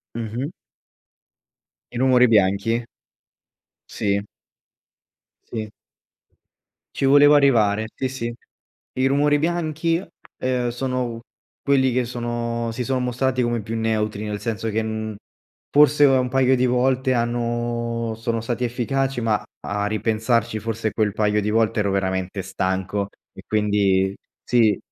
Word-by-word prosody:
Mh 115 - -3 0.2
mh. 135 +5 -2 1.4
I - - -8
rumori 125 -1 +5
bianchi. 105 +2 +2 1.0
Sì. 100 -1 0 1.2
Sì. 110 -2 -6 1.2
Ci - - -2
volevo 145 +2 +7
arrivare, 110 -7 +3
sì, 130 - -2
sì 120 -2 -4 0.6
i 130 +1 +1
rumori 145 +2 +3
bianchi, 165 +1 0 0.4
uhm, 125 -1 0
sono 125 -1 -3 0.4
quelli 135 -2 +3
che 125 0 +1
sono 120 -1 -3
si 125 +2 -3
son 130 0 0
mostrati 130 +1 0
come 120 -1 0
più 110 +2 -5
neutri, 110 -2 -1
nel 105 -1 -4
senso 115 -1 -3
che, 110 +1 0
mhmm, 110 -1 -4 0.5
forse 145 0 +5
un 130 -2 +3
paio 130 0 +3
di 130 0 +2
volte 130 +1 +2
hanno 120 -1 -1
sono 115 +1 -2
stati 120 +2 -3
efficaci 130 +2 -1
ma 110 -2 +2
a - - -5 0.4
a - - 0
ripensarci 110 +1 0
forse 110 0 -2
quel 105 -3 0
paio 105 0 +1
di 105 - -1
volte 115 +1 +1
ero 100 -1 +1
veramente 95 0 -1
stanco 95 +1 -2 0.3
e - - -12
quindi, 100 -3 +2 0.3
sì 115 -5 +3
115 Hz, 130 wpm, -22 LUFS, 110-130 Hz, 1.4 s, volevo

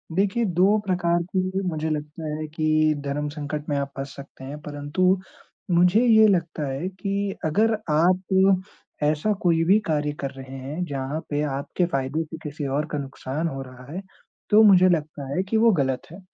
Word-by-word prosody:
देखिए 205 +4 +1
2 200 +3 +5
प्रकार 175 -2 +1
के 185 +1 0
मुझे 160 -1 -2
लगता 150 +1 -4
है 155 0 -4
कि 155 0 +2
धर्म 145 +1 -2
संकट 150 0 -5
में 145 - 0
आप 140 0 -2
फँस 135 0 -6
सकते 140 -1 -12
हैं, 145 +3 -7
परंतु 150 +6 0 0.5
मुझे 180 +6 +5
ये 220 -2 +7
लगता 165 -6 0
है 145 +7 -3
कि 195 +1 -3
अगर 220 +8 +2 0.2
आप 185 +4 +3 0.4
ऐसा 155 +8 +2
कोई 165 -2 +3
भी 195 +5 +5
कार्य 150 -1 0
कर 140 -1 -3
रहे 135 0 -10
हैं, 145 +7 -4
जहाँ 140 +1 -3
पे 145 0 0 0.2
आपके 175 +5 -1
फ़ायदे 140 0 -1
से 160 +1 -9
किसी 145 -1 -5
और 145 +3 0
का 150 - -1
नुकसान 140 +3 -4
हो 135 -3 -4
रहा 130 +1 -11
है, 185 +3 -4 0.5
तो 215 +1 +7
मुझे 185 -3 +7
लगता 150 -4 -1
है 185 - +1
कि 220 +3 -1
वो 230 0 +5
गलत 130 -1 -1
है। 180 - -10
155 Hz, 185 wpm, -24 LUFS, 145-185 Hz, 0.5 s, ये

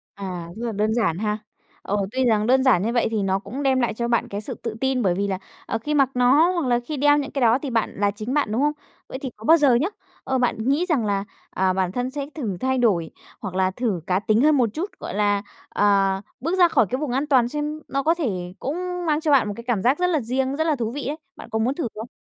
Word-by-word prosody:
À, 185 -4 -6
rất 235 - -4
là 230 - -2
đơn 215 +1 0
giản 210 -8 +1
ha. 210 +1 -1 0.4
Ờ, 205 - -1 0.2
tuy 260 0 +1
rằng 215 -2 +2
đơn 260 +1 +4
giản 240 -9 +4
như 230 +2 0
vậy 240 - +2
thì 215 -2 0
nó 195 0 +1
cũng 225 +8 -6
đem 265 -2 +2
lại 240 -3 0
cho 235 +1 -2
bạn 235 -1 +1
cái 200 - -4
sự 215 - -6
tự 230 -2 -6
tin, 265 -1 +1
bởi 185 -4 +2
vì 200 +2 -1
là, 190 -1 -2 0.3
ờ, 225 - -1
khi 295 +6 -3
mặc 275 -3 +4
nó 265 +7 +5
hoặc 340 -6 -1
là 240 -1 +2
khi 305 - -3
đeo 290 +1 +4
những 280 -2 -3
cái 275 - -2
đó 235 +1 +5
thì 280 -1 -5
bạn 230 -2 0
là 205 0 +2
chính 215 +5 -5
bạn, 290 -8 +1
đúng 230 - 0
không? 295 0 +3 0.4
Vậy 260 - -6
thì 265 -1 -5
có 220 - -14
bao 325 +7 +7
giờ 280 -6 +4
nhá, 295 +10 +2 0.4
ờ, 265 -1 0
bạn 245 -1 +1
nghĩ 295 +6 +2
rằng 280 -9 +1
là, 200 -1 0 0.3
à, 190 0 +1
bản 185 -1 -1
thân 250 +1 -2
sẽ 280 0 -4
thử 220 - -3
thay 260 0 0
đổi 195 -9 +2 0.3
hoặc 195 -4 -6
là 185 0 +2
thử 205 -3 -2
cá 185 0 +2
tính 215 +2 +2
hơn 305 -1 +5
một 245 -3 +3
chút, 365 +6 -3
gọi - - -6
là, 205 -1 +1 0.3
ờ, 195 -1 +2 0.2
bước 335 +8 -1
ra 350 -1 +7
khỏi 225 -9 +3
cái 255 - -1
vùng 300 -4 -2
an 270 +4 0
toàn 255 -5 +3
xem 300 +3 -3
nó 275 +1 -1
có 325 +4 +3
thể 190 - -3
cũng 355 +4 -3
mang 300 -1 +2
cho 310 - 0
bạn 265 -7 +4
một - - -2
cái 235 - -9
cảm 230 -6 0
giác 255 +6 +3
rất 360 - +2
là 315 -4 +1
riêng, 260 +3 -1
rất 315 - 0
là 310 -3 +2
thú 230 -3 -2
vị 280 -1 -5
ấy. 295 - -2 0.2
Bạn - - -11
có 220 - +1
muốn 240 +5 +1
thử 285 -7 -2
không? 220 +3 -7
245 Hz, 285 wpm, -23 LUFS, 210-285 Hz, 0.4 s, bao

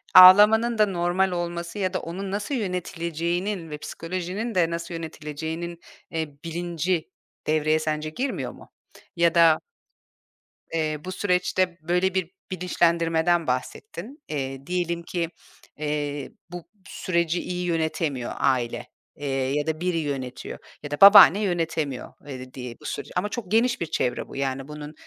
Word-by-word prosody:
ağlamanın 210 +5 +9
da 215 - +6
normal 180 0 +1
olması 175 +2 -3
ya 185 -1 0
da - - 0
onun 190 +4 -5
nasıl 210 +7 -2
yönetileceğinin 175 -2 -2
ve 150 - -5
psikolojinin 185 +8 -4
de 170 -2 +3
nasıl 170 +1 -4
yönetileceğinin, 160 +1 -5 0.3
eee, 155 -3 -4
bilinci 170 0 -2 0.4
devreye 155 0 +2
sence 155 0 -2
girmiyor 260 - -3
mu? - - -15 0.5
Ya 170 0 +3
da 165 -2 +6 1.1
eee, 155 -2 0
bu 185 - -4
süreçte 180 -2 +1
böyle 180 +3 +1
bir 185 -2 -1 0.2
bilinçlendirmeden 170 -2 +2
bahsettin. 215 - -4
Eee, 135 -2 -4
diyelim 170 -1 -1
ki, 170 -1 -2 0.5
eee, 145 -2 -3 0.2
bu 175 -2 -6 0.2
süreci 170 -1 0
iyi 180 0 -3
yönetemiyor 160 -6 -1
aile, 125 -4 0 0.3
eee, 145 - -6
ya 135 +2 0
da 160 +1 -2
biri 180 -2 0
yönetiyor 135 -5 -4 0.2
ya 145 - -6
da 145 - -4
babaanne 200 -1 +10
yönetemiyor, 165 -8 -2
eee, 130 -2 -8
diye 125 -2 -7
bu - - -13
süreci. - - -5
Ama 195 +3 0
çok 210 -6 -6
geniş 240 0 +3
bir - - +1
çevre 125 -5 -1
bu. - - -11
Yani 135 0 -2
bunun 150 0 -8
170 Hz, 140 wpm, -25 LUFS, 150-180 Hz, 1.1 s, babaanne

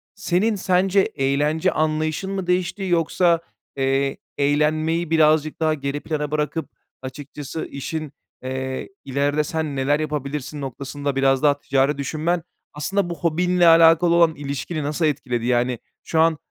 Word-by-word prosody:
Senin 205 +2 +1
sence 190 +1 +2
eğlence 150 0 +1
anlayışın 155 +4 -1
mı 190 -2 -3
değişti 180 +2 0
yoksa, 170 -1 +2 0.4
eee, 135 0 0 0.2
eğlenmeyi 155 +3 +1
birazcık 155 -1 +3
daha 155 -1 +2
geri 140 0 -3
plana 150 -2 -3
bırakıp 155 +2 -2 0.3
açıkçası 145 +3 -7
işin, 150 +1 -5 0.3
eee, 130 0 -4 0.2
ilerde 140 +3 0
sen 155 -1 -3
neler 140 +3 +1
yapabilirsin 150 -1 -4
noktasında 140 +1 -4
biraz 135 +1 +2
daha 145 -1 +4
ticari 140 +1 +1
düşünmen, 160 +4 -1 0.3
aslında, 175 +5 -1
bu 170 - -3
hobinle 175 +1 +2
alakalı 165 +1 +6
olan 165 -2 +4
ilişkini 140 +2 -4
nasıl 155 +3 -1
etkiledi? 125 -5 -1
Yani, 125 -1 +1 0.2
şu 160 - -1
an 160 -1 +4
150 Hz, 135 wpm, -22 LUFS, 140-165 Hz, 0.4 s, alakalı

